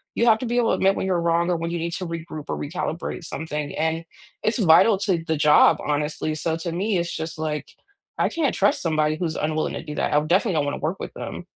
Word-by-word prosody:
You 235 - +2
have 220 -2 +5
to 255 - -4
be 240 +1 -1
able 235 -2 +3
to - - +2
admit 195 +1 +2
when - - -1
you're 180 -3 +1
wrong 170 +1 +1
or 175 - +2
when 165 0 -3
you 170 - -2
need 170 +1 -3
to 185 - -3
regroup 165 -3 -6
or - - -2
recalibrate 165 +2 -4
something, 150 -3 -4
and 160 +1 0 0.4
it's 220 - +1
vital 190 +3 +6
to 190 -5 0
the 160 -3 0
job, 150 0 +6
honestly 150 +1 -1
so, 160 +1 -1
to 165 0 -4
me, 195 +3 0
it's 170 0 -2
just 160 0 -5
like, 150 -2 -3 0.5
I - - +2
can't 320 -4 0
trust 285 - +2
somebody 155 -2 +1
who's 165 -1 -3
unwilling 155 0 -1
to - - -5
do 150 - -7
that, - - -1
I 150 - +5
definitely 185 +4 +2
don't 145 - +1
wanna 145 - -3
work 165 +6 -2
with - - -6
them. - - -7
165 Hz, 250 wpm, -23 LUFS, 155-185 Hz, 0.5 s, vital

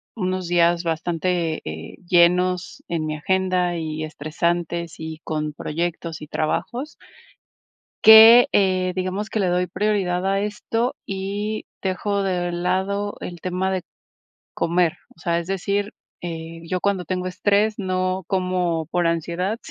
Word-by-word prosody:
unos 185 -3 -2
días 170 0 +3
bastante, 165 0 -1
eh, 80 0 -7
llenos 180 +1 +2
en 160 -2 -2
mi 155 - -2
agenda 185 0 +1
y 155 -1 -4
estresantes 170 +2 -2
y 160 0 -7
con 155 -1 -3
proyectos 165 +1 -4
y 150 - -8
trabajos. 240 - -2 1.1
Que, 225 +2 +10
eh, 185 -2 +2
digamos 185 +3 -3
que 215 - -1
le 190 - +2
doy 180 0 +1
prioridad 185 -1 0
a 195 - +1
esto 225 +3 -2
y 200 +2 -3 0.2
dejo 200 +1 -1
de 180 -2 -1
lado 190 +4 -1
el 175 -1 -7
tema 185 +1 -1
de 190 -1 -1 0.7
comer. 170 -1 +1 0.2
O - - -24
sea, 170 -1 +1
es 170 - -7
decir, 200 +2 -1 0.3
eh, 165 -1 -6
yo 185 +1 -2
cuando 195 -3 0
tengo 180 +2 -2
estrés 205 +3 +1
no 185 -1 -1
como 180 -4 0
por 175 +1 +1
ansiedad, 170 +5 -1
180 Hz, 135 wpm, -22 LUFS, 170-195 Hz, 1.1 s, Que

